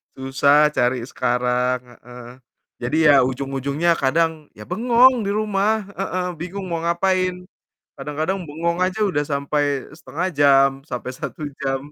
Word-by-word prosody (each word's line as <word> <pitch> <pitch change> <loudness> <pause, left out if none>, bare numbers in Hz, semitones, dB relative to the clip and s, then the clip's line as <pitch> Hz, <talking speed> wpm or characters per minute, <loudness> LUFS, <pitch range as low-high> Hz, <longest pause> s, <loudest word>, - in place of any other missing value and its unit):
Susah 140 +3 +3
cari 125 -3 0
sekarang, 125 0 0 0.2
heeh. 125 -1 -11 0.5
Jadi 125 +6 -1
ya 140 -2 +7
ujung-ujungnya 135 +5 0
kadang 160 +2 0
ya 105 - -10
bengong 240 +4 +4
di 200 - -1
rumah, 210 0 0
heeh, 185 0 -2
bingung 185 +4 -6
mau 165 -1 -2
ngapain. 185 +1 0 0.5
Kadang-kadang 155 +7 -3
bengong 170 +4 -2
aja 185 +3 0
udah 145 -7 0
sampai 140 -1 -1
0,5 165 +2 -4
jam 140 -2 +5 0.2
sampai 125 +1 -5
1 150 +4 -7 0.2
jam. 135 +1 -2
150 Hz, 130 wpm, -21 LUFS, 135-185 Hz, 0.5 s, ya